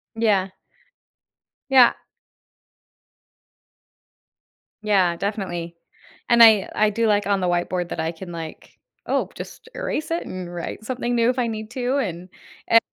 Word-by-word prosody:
Yeah. 205 -4 +2 1.2
Yeah. 260 -3 +7 2.9
Yeah, 190 -5 +3
definitely, 175 -3 -4 0.5
and 235 -1 +7
I 220 -3 +6
I 215 0 +3
do 225 +2 0
like 205 -1 +2
on 200 -1 +2
the 180 - 0
whiteboard 175 0 -1
that 170 - -5
I 160 +1 -1
can, 175 +2 -10
like, 165 -2 -9 0.3
oh, - - 0
just 475 - -10
erase 330 -11 -3
it 335 - -1
and 180 -1 -7
write 175 +5 -6
something 245 -1 -2
new 235 0 +3
if 255 +1 0
I 240 - +1
need 220 -1 -5
to, 255 +2 -1
and, 180 -8 -3 0.4
eh 230 - +7
205 Hz, 140 wpm, -23 LUFS, 175-235 Hz, 2.9 s, Yeah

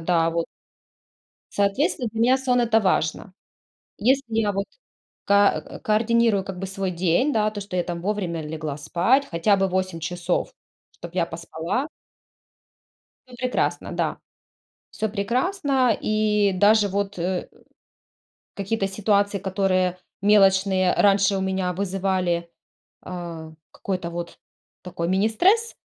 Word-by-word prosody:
да 165 0 +2
вот. 165 0 -1 1.1
Соответственно, 215 +5 +1
для 225 - -1
меня 255 +3 +4
сон- 250 -2 +1
это 225 -2 +3
важно. 185 -1 0 0.7
Если 265 +6 +3
я 215 -2 +2
вот 200 +1 -2 0.6
ка 200 0 +4
к - - -11
координирую 220 -1 +2
как 190 -1 -7
бы 195 - -4
свой 195 0 -3
день, 180 - +1
да, 215 -4 +1
то, 205 -1 -6
что 195 -2 -7
я 175 - +1
там 170 -1 -5
вовремя 185 -4 -2
легла 155 -1 -5
спать, 230 - +1
хотя 175 +5 +2
бы 195 - +2
8 185 -2 -2
часов, 175 - -2 0.4
чтобы 170 +1 -11
я 170 -2 +1
поспала. 170 - -3 1.4
Ну 250 - -13
прекрасно, 255 0 -1
да. - - -1 0.7
Всё 220 0 -2
прекрасно. 255 - +1
И 210 -2 +2
даже 205 +2 +4
вот, 200 0 -2
э, 180 +1 -2 1.1
какие-то 200 0 -2
ситуации, 200 0 +1
которые 185 -1 0 0.2
мелочные 190 -2 +4
раньше 200 -1 +3
у - - -2
меня 190 -1 -1
вызывали, 185 -2 -1 0.5
а, 170 -3 -7 0.2
какой-то 185 -3 -4
вот 170 0 -6 0.4
такой 170 -2 -4
министресс. 345 - +2
195 Hz, 125 wpm, -23 LUFS, 180-215 Hz, 1.4 s, меня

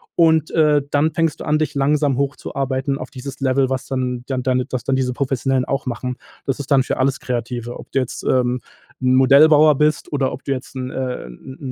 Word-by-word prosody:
und, 160 -2 +3
äh, 150 -3 +3
dann 150 +2 +2
fängst 165 0 0
du - - -6
an 155 0 +2
dich 155 - -1
langsam 140 -1 +1
hochzuarbeiten 135 0 -2
auf - - -7
dieses 135 0 -8
Level, 135 0 +2
was 130 0 -2
dann 125 -2 -2
dann 130 -2 -2
deine 130 -1 +1
dass 130 -3 -4
dann 135 - 0
diese 130 -1 0
Professionellen 135 0 0
auch 135 -1 -2
machen. 125 +1 -3 0.3
Das 135 0 -2
ist 140 - -6
dann 135 -3 +4
für - - -3
alles 130 0 +1
Kreative, 120 -1 -4
ob - - -12
du 135 - -1
jetzt, 125 - -4
ähm, 125 -1 +1 0.4
Modellbauer 140 +4 +6
bist 150 +1 0
oder 135 -2 +1
ob 130 - -8
du - - -3
jetzt, 135 0 -4
'n, 130 0 -4
äh, 130 - -4
'n 95 - -11
135 Hz, 210 wpm, -20 LUFS, 125-145 Hz, 0.4 s, Modellbauer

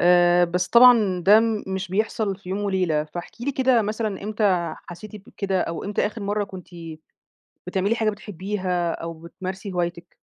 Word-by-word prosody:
آآ 175 0 +5
بس 180 +1 -1
طبعًا 235 -7 +6
ده 210 +2 +8 0.3
مش 190 -1 -3
بيحصل 210 0 -1
في 180 - -14
يوم 190 +2 -2
وليلة، 180 -6 0
فاحكي 175 +9 -8
لي 280 - -1
كده 255 -3 +3
مثلًا 215 -1 -3
إمتى 200 -6 0
حسّيتِ 210 +5 -9
بكده، 195 -2 -2
أو 165 - -3
إمتى 205 0 0
آخر 215 0 -6
مرّة 205 +1 -1
كنتِ 190 -3 -11 1.0
بتعملي 195 +4 0
حاجة 220 -2 +1
بتحبيها 190 -3 -3
أو 165 0 -5
بتمارسي 185 +4 -7
هوايتِك؟ 175 -1 -4
190 Hz, 160 wpm, -23 LUFS, 175-210 Hz, 1.0 s, ده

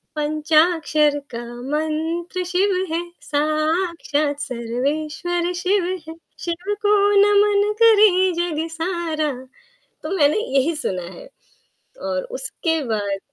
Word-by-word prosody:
पंचाक्षर 305 0 +2 0.2
का 235 - -4 0.3
मंत्र 320 +4 -2
शिव 380 +3 +1 0.2
है, 335 - 0 0.2
साक्षात 310 -1 0
सर्वेश्वर 300 +8 -2
शिव 365 +2 +1 0.2
है, 325 - -7 0.3
शिव 355 +4 -3
को 415 0 +5 0.3
नमन 410 0 +4
करें 405 -5 +5
जग 330 -2 -1
सारा 330 -3 -2 0.7
तो - - -4
मैंने 290 +4 +4 0.2
यही 285 +5 +2
सुना 190 - -3
है। - - -12 0.8
और - - -1
उसके 325 -10 -2
बाद 205 -4 -2
325 Hz, 105 wpm, -21 LUFS, 300-360 Hz, 0.8 s, को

